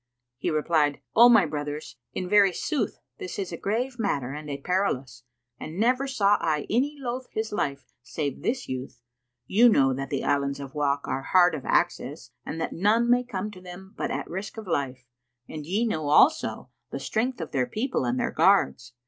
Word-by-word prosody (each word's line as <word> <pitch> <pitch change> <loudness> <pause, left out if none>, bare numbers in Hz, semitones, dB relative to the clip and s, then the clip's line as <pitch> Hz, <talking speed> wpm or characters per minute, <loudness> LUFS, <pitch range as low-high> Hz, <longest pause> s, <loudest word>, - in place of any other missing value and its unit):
He - - -1
replied, 155 -2 +1 0.2
"O 235 +2 +9
my 225 -6 +6
brothers, 145 -3 -5 0.2
in 185 - -4
very 200 0 +5
sooth 290 - -2 0.2
this 385 -2 -6
is 190 -3 -3
a - - -3
grave 240 +8 -2
matter 140 - -1
and 150 0 -7
a 140 - -3
perilous; 140 -7 -1 0.4
and 155 +3 -7
never 255 +4 +2
saw 210 -6 +3
I 155 -3 0
any 270 +7 +1
loathe 255 -1 -4
his 220 0 -3
life 140 -9 -3
save 140 +4 -4
this 245 +3 -2
youth. 130 -2 -6 0.4
You 230 - +5
know 135 - +4
that 135 +1 -4
the 140 - -2
Islands 140 -1 0
of 135 -1 -8
Wak 145 -1 0
are 135 - -2
hard 180 +4 +4
of 150 -4 -5
access - - 0
and 165 - -5
that 160 - -3
none 225 +6 +2
may 245 0 +4
come 210 -4 -4
to 185 -3 -12
them 185 +2 -11
but - - -3
at - - -3
risk 190 +6 -6
of 220 - -6
life; 130 -7 -2 0.4
and 155 -1 -7
ye 205 +7 +1
know 155 -10 -2
also 270 - +3 0.2
the - - -5
strength 245 +3 -1
of 160 - -5
their 130 -2 0
people 255 +5 -1
and 250 +1 0
their 235 - 0
guards. 125 -11 +2
180 Hz, 195 wpm, -26 LUFS, 145-225 Hz, 0.4 s, O